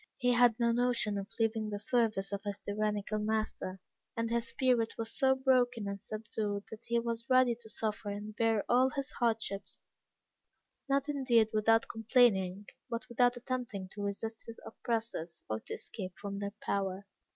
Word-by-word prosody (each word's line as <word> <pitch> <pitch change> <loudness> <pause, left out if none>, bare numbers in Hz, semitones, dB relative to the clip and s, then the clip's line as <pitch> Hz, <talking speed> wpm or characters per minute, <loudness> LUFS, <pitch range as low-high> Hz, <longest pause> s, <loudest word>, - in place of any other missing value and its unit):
He 245 -1 +2
had 240 -1 +5
no 235 -1 +4
notion 240 -3 +1
of 195 +1 -6
leaving 220 -1 +1
the 205 - -3
service 215 -2 +1
of 200 0 -2
his 205 -1 -3
tyrannical 210 0 -1
master, 215 -3 -2 0.4
and 230 0 -1
his 235 0 0
spirit 245 -3 +2
was 225 0 -4
so 265 -3 +4
broken 250 -5 +2
and 200 -1 -4
subdued 210 -1 -3
that 220 +1 -9
he 235 - +1
was 235 0 -3
ready 255 -1 +5
to 220 - -12
suffer 215 -1 -2
and 205 +1 -5
to - - -9
bear 225 -1 +2
all 255 +2 +5
his 275 -1 -3
hardships: 220 -4 -2 1.0
not, 275 +1 +2
indeed, 255 -6 +3
without 225 +1 +4
complaining, 210 -4 +3 0.2
but 230 -1 -4
without 245 +1 +3
attempting 240 -6 -4
to 205 - -8
resist 210 +2 -3
his 230 - -8
oppressors 225 -9 -3
or 110 0 -2
to - - -6
escape 185 -4 -7
from 200 -1 -4
their 200 0 -4
power. 195 0 -1
225 Hz, 170 wpm, -32 LUFS, 205-240 Hz, 1.0 s, had